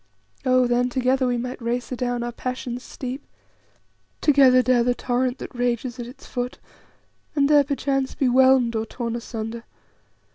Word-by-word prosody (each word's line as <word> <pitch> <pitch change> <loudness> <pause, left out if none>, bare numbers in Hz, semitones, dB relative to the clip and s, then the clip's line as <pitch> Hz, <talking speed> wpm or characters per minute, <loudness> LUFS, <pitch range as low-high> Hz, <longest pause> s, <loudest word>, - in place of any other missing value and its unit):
"Oh, 255 0 +4
then 245 +1 +1
together 255 +1 +1
we 245 -1 0
might 250 +1 -5
race 240 +2 -2
adown 245 -1 -2
our 240 - -3
passions' 250 0 -5
steep; 260 +2 -7 1.0
together 265 -4 +5
dare 250 -2 +3
the 245 0 +1
torrent 250 +1 -1
that - - -8
rages 245 0 -2
at 240 - -5
its 250 - -13
foot, 245 -1 -4 0.8
and 280 -2 +3
there 295 -1 +6
perchance 275 -1 -1
be 270 - +1
whelmed 255 -2 +4
or 220 0 -1
torn 235 -2 -4
asunder. 230 -1 -5
250 Hz, 155 wpm, -23 LUFS, 240-260 Hz, 1.0 s, there